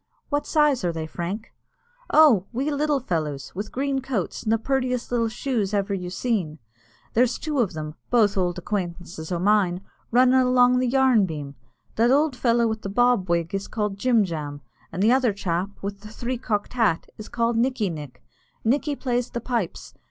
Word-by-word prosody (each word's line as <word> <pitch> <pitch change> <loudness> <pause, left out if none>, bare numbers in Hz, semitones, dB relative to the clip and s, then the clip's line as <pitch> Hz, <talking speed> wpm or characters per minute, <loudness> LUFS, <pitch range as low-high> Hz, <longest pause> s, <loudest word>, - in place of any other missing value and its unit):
"What 290 0 -1
size 300 -5 +3
are 175 - +1
they, 160 -1 -4
Frank?" 180 +7 -5 0.6
"Oh, 250 -12 +6
little 290 +3 0
wee 255 - -19
fellows, 150 - -3
with 205 +3 -5
green 270 0 -1
coats, 250 -9 -3
an' - - -2
the 225 - +4
purtiest 250 0 -1
little 230 -2 +1
shoes 220 -4 -1
ever 200 0 0
you 180 -2 -3
seen. 185 -6 -2 0.6
There's 245 +1 +3
two 300 -3 -2
of 210 -7 +1
them 155 -1 -5 0.2
both 220 -4 +3
ould 180 -2 0
acquaintances 175 -3 -4
o' 175 - 0
mine 185 -1 +2 0.3
runnin' 255 +2 +5
along 250 0 +4
the 255 - +1
yarn 250 -5 +4
beam. 145 -4 -6 0.4
That 230 +2 +4
ould 285 +1 +3
fellow 235 -1 +2
with 220 -1 -3
the 195 - -5
bob 245 -3 +2
wig 170 0 0
is 195 0 -2
called 210 -3 -3
Jim 235 -1 +3
Jam, 150 -4 -5 0.3
an' 180 - -3
the 220 +3 +5
other 255 -4 +3
chap, 185 -1 -2
with 200 0 -4
the 210 - -12
three 240 +3 -4
cocked 210 -3 -2
hat, 225 -9 +1
is 215 - -8
called 235 0 0
Nickey 230 -5 +1
Nick. 150 -5 -9 0.4
Nickey 285 +5 +1
plays 245 -2 -1
the 235 - -4
pipes. 235 -6 -3
220 Hz, 185 wpm, -24 LUFS, 180-250 Hz, 0.6 s, Oh